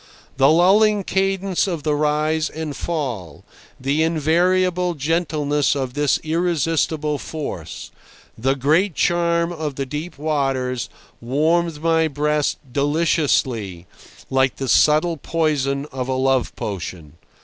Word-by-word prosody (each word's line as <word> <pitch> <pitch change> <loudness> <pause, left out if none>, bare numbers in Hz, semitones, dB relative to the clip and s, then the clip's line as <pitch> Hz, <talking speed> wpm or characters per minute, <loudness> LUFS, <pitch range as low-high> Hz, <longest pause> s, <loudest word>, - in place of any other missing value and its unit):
The 135 +1 +5
lulling 200 +5 +4
cadence 195 0 0
of 170 -6 -3
the 150 - +1
rise 155 +1 +1
and 155 -2 -5
fall, 125 - -4 0.3
the 140 +4 0
invariable 175 +3 +1
gentleness 150 -2 0
of 130 -3 -3
this 145 0 +2
irresistible 160 -2 0
force, 90 - -6 0.4
the 135 +4 0
great 155 +7 +2
charm 170 0 +1
of 155 -4 -4
the 135 - -3
deep 150 +5 -6
waters, 135 -4 -1 0.3
warmed 155 +5 0
my 165 -1 +3
breast 150 0 0 0.2
deliciously, 140 - 0 0.5
like 130 0 +2
the 135 - -4
subtle 155 +5 +3
poison 145 -3 -1
of 130 -1 -4
a 130 - -1
love 130 0 +1
potion. 90 -6 -6
150 Hz, 115 wpm, -21 LUFS, 135-165 Hz, 0.5 s, The